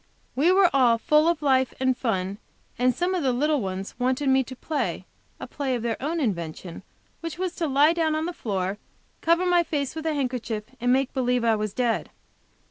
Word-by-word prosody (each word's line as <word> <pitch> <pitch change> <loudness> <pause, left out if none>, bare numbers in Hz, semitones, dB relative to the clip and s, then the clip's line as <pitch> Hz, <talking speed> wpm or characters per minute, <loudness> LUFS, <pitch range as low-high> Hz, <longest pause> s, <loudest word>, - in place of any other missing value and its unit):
We 305 +7 +4
were 375 -1 +5
all 245 -4 +5
full 300 +6 +3
of 335 -3 0
life 260 -3 +2
and 260 -1 +2
fun, 195 -5 -2 0.4
and 250 0 +3
some 355 +2 0
of 365 - 0
the 265 -3 +2
little 290 +3 +1
ones 190 0 -4
wanted 260 +3 +1
me 265 0 +4
to 260 - -9
play 300 +4 -3 0.3
a - - -6
play 270 -3 -2
of 235 - -4
their 230 -1 -2
own 320 +5 -1
invention, 170 - -3 0.4
which 330 -1 -6
was 365 -1 -2
to 330 - 0
lie 290 +3 +4
down 320 -2 +1
on 310 +1 -1
the 350 - -3
floor, 195 - -3 0.4
cover 335 +2 +3
my 355 -1 +4
face 290 -5 -2
with 320 0 -4
a 310 - 0
handkerchief, 245 -5 -2 0.2
and 245 +1 +1
make 265 +1 +1
believe 250 -2 +1
I 225 -1 +3
was 210 -1 -2
dead. 235 +1 -1
265 Hz, 210 wpm, -25 LUFS, 235-315 Hz, 0.4 s, were